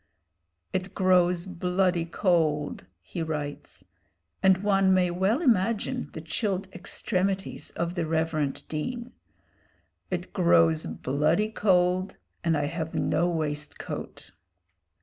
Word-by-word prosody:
"It 185 0 -3
grows 180 -1 +3
bloody 180 -1 0
cold," 160 - 0 0.2
he 165 - -5
writes 150 -3 -5 0.6
and 190 0 +4
one 195 -2 +4
may 180 -1 +2
well 195 - +1
imagine 225 - +1
the 160 - -6
chilled 190 +4 -2
extremities 190 +1 -2
of 170 0 -3
the 170 -3 -2
reverend 160 -3 -1
Dean 240 +11 -4 1.0
"it 180 -1 -4
grows 165 -3 +4
bloody 155 +10 +1
cold, 185 -2 +2 0.3
and 165 -2 +2
I 145 - 0
have 160 +1 -4
no 175 +1 +1
waistcoat." 150 -3 -4
180 Hz, 110 wpm, -27 LUFS, 160-190 Hz, 1.0 s, and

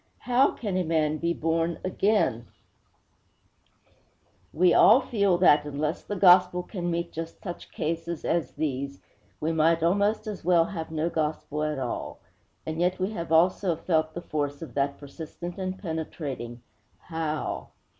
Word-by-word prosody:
'How 250 +2 +3
can 200 -5 -3
a 185 - +1
man 155 -2 +1
be 170 0 0
born 165 +1 0
again?' 185 - +1 2.0
We 175 +2 +4
all 225 +5 +7
feel 200 -8 +1
that, 150 -5 +5
unless 150 +3 -2
the 205 - -5
gospel 180 -1 +5
can 175 -2 -4
meet 170 0 -2
just 165 0 -7
such 175 -3 -7
cases 165 +1 -3
as 165 -6 0
these, 140 -2 -3 0.4
we 160 +2 0
might 165 +1 +3
almost 205 +6 +2
as 210 -3 -6
well 170 -1 +4
have 165 -4 -5
no 160 +1 -1
gospel 150 -1 -2
at 155 -1 -1
all. 125 -3 -4 0.5
And 160 +1 -3
yet 180 +1 +2
we 190 +3 -1
have 170 -6 -5
also 175 +2 +3
felt 160 -1 0
the 175 - -5
force 145 -1 -3
of 165 - -9
that 140 0 0
persistent 160 +5 -8
and 185 0 -3
penetrating 145 - -5 0.5
_How? 160 -2 -3
165 Hz, 150 wpm, -27 LUFS, 155-180 Hz, 2.0 s, all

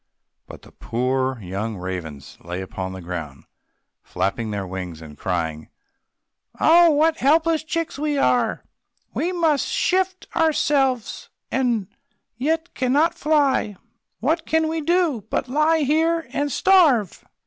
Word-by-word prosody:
But - - -12
the - - -16
poor 130 +1 -2
young 100 +4 -4
ravens 80 -7 -7
lay 90 +1 -5
upon 95 0 -5
the 95 0 -8
ground, 80 -6 -6 0.6
flapping 110 +3 -2
their 100 -2 -3
wings, 90 -3 -6
and 80 -2 -11
crying, 80 -2 -3 0.9
"Oh, 340 +1 +6
what 315 +1 +3
helpless 320 +3 +2
chicks 330 -2 -3
we 295 -1 -1
are! 245 -4 +1 0.5
We 350 - -1
must 325 -5 +1
shift 370 0 0
for - - -4
ourselves, 275 -6 +1 0.2
and 240 -6 0 0.5
yet 320 +7 -1
we - - -19
cannot 285 +6 +2
fly! 285 -9 +1 0.5
What 320 +7 0
can 320 0 +2
we 320 0 -2
do, 325 - +1
but 260 - -1
lie 305 +4 +2
here 325 +3 +1
and 290 0 -1
starve?" 305 - +3
270 Hz, 135 wpm, -22 LUFS, -, 0.9 s, Oh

